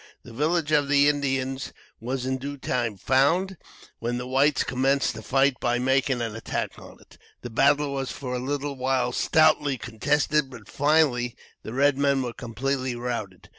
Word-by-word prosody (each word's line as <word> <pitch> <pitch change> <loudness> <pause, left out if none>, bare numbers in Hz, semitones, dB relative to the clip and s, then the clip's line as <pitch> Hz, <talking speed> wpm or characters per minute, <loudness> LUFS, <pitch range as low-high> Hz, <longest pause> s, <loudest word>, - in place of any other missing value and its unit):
The 120 - -12
village 155 +4 0
of 145 -2 +3
the 145 0 +4
Indians 135 -2 -1 0.3
was 125 +2 -3
in 130 0 -1
due 140 +2 -6
time 120 -5 -2
found, 160 - +2 0.4
when 120 +1 -2
the 125 - -4
whites 135 +2 +2
commenced 135 +2 +1
the 110 - -8
fight 135 +2 +2
by 120 0 +1
making 130 0 +1
an 115 -2 -4
attack 115 - -4
on - - -14
it. - - -20 0.2
The 120 - -6
battle 140 +4 +3
was 135 -1 -3
for 125 -2 -6
a 125 - -1
little 140 +2 -3
while 130 -1 0
stoutly 150 0 +3
contested; 145 +5 0
but 115 -6 -12
finally 140 -5 +2 0.3
the 110 - -8
red 140 +1 +2
men 140 -1 +2
were 120 -2 -4
completely 130 +2 -3
routed. 115 -6 -5
135 Hz, 170 wpm, -25 LUFS, 125-145 Hz, 0.4 s, the